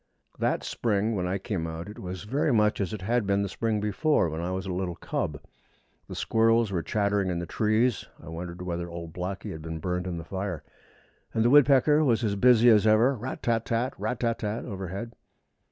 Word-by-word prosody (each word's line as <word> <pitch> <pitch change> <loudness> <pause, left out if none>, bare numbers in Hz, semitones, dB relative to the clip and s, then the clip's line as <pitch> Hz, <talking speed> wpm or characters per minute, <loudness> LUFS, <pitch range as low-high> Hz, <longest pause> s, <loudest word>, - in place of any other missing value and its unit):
That - - 0
spring 110 -1 0
when 90 -4 -1
I 95 +2 -1
came 95 -4 -3
out 80 +2 -6
it 105 - -9
was 90 +1 -6
very 135 +7 0
much 105 -3 +2
as 95 - -2
it 105 -3 -6
had 115 0 0
been 100 0 +2
the - - -1
spring 110 +2 -1
before, 105 - +1
when 80 +1 -4
I 85 - -2
was 95 +1 -3
a 95 - -3
little 90 -1 -2
cub. - - -3 0.7
The - - -7
squirrels 115 -1 +2
were 90 -3 0
chattering 100 0 0
in 90 - -1
the 85 - -3
trees 110 +6 +1
(I - - -14
wondered 85 +2 -6
whether 85 -1 -3
old 85 -1 -7
Blacky 90 +2 -4
had 80 - -7
been 80 0 -5
burned 90 +2 -2
in 90 -2 -3
the 85 - -6
fire), 95 -3 -4 0.7
and 110 0 +2
the 120 - +4
woodpecker 145 +1 +6
was 120 -5 +2
as 105 -2 0
busy 120 +2 +5
as 110 -2 +6
ever 110 +5 +5
rat 125 +3 -6
tat 115 -1 +1
tat 120 +3 -1
tat! - - -18
rat 125 - -2
tat 115 -1 0
tat 105 +2 -3
tat! - - -9
overhead. 95 +2 -5
100 Hz, 220 wpm, -27 LUFS, 90-115 Hz, 0.7 s, woodpecker